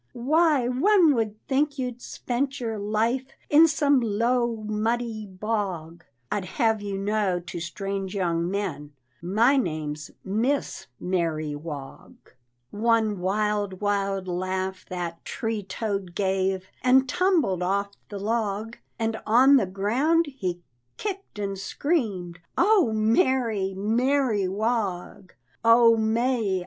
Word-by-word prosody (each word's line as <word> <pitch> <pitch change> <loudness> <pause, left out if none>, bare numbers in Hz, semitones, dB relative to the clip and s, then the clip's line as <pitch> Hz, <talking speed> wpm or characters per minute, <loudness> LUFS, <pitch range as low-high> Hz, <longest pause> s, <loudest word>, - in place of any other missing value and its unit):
"Why, 290 +1 +2
one 325 +5 +4
would 220 -3 -2
think 285 +1 0
you'd 250 -2 -4
spent 270 +3 -3
your 225 -3 -3
life 225 +5 0 0.2
In 315 +3 +8
some 290 -3 +3
low, 235 +2 +1
muddy 220 +1 -2
bog. 185 -5 -4 0.3
I'd 200 -3 -1
have 225 -5 +2
you 200 -1 -4
know 200 -2 0
to 175 0 -7
strange 195 +3 -4
young 170 -3 0
men 165 -8 -4 0.3
My 220 +10 +3
name's 155 - -3
Miss 235 +9 -1
Mary 165 -4 -1
Wog." 145 -3 -8 0.6
One 220 -2 +1
wild, 205 0 -1
wild 195 -2 -1
laugh 185 +1 -3
that 175 -2 -5
tree 225 -2 -3
toad 195 -2 -4
gave, 190 -1 -1
And 260 +1 +4
tumbled 325 - +1
off 200 +2 0 0.2
the 205 - -6
log, 215 +1 -2 0.2
And 225 -1 -2
on 260 +5 +6
the 210 -7 +1
ground 250 - +1
he 180 -7 -3 0.3
kicked 395 - -5
and 195 -2 -3
screamed, 195 - -2 0.2
"Oh, 385 - +4
Mary, 220 -2 +1
Mary 230 0 +1
Wog. 195 -3 -2 0.3
Oh, 230 0 +6
May! 225 -2 +1
210 Hz, 120 wpm, -25 LUFS, 190-245 Hz, 0.6 s, In